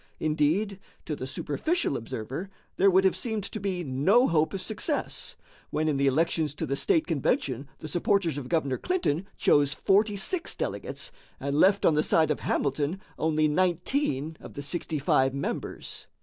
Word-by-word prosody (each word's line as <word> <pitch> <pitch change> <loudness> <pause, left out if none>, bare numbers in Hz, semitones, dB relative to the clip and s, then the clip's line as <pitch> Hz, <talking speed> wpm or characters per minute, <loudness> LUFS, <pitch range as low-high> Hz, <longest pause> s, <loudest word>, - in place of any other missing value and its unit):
Indeed, 160 +7 +1 0.3
to 155 - -3
the 130 - -5
superficial 145 - -1
observer 120 - -5 0.3
there 195 +2 +5
would 190 0 +4
have 190 - +3
seemed 220 -4 -2
to 215 - -6
be 190 -3 -2
no 165 - +3
hope 160 -2 +2
of 195 - -3
success, 220 - -2 0.3
when 155 +1 0
in 150 -3 +1
the 140 0 +2
elections 155 +1 +1
to - - -2
the 140 - -1
state 325 - +2
convention 140 -4 -1
the 155 - -8
supporters 175 - +1
of 135 -3 -6
Governor 140 -6 0
Clinton 200 - 0
chose 145 -1 +3
forty 205 +2 +3
six 335 - 0
delegates - - -3 0.3
and 140 +1 -2
left 195 +3 +4
on 165 - +5
the 150 - +3
side 155 0 +3
of 150 - -1
Hamilton 145 +6 -1 0.2
only 155 -1 +2
nineteen 170 - 0
of - - -11
the 140 - -5
sixty 160 +1 -2
five 135 -1 +2
members. 140 - -4
160 Hz, 170 wpm, -27 LUFS, 145-195 Hz, 0.3 s, there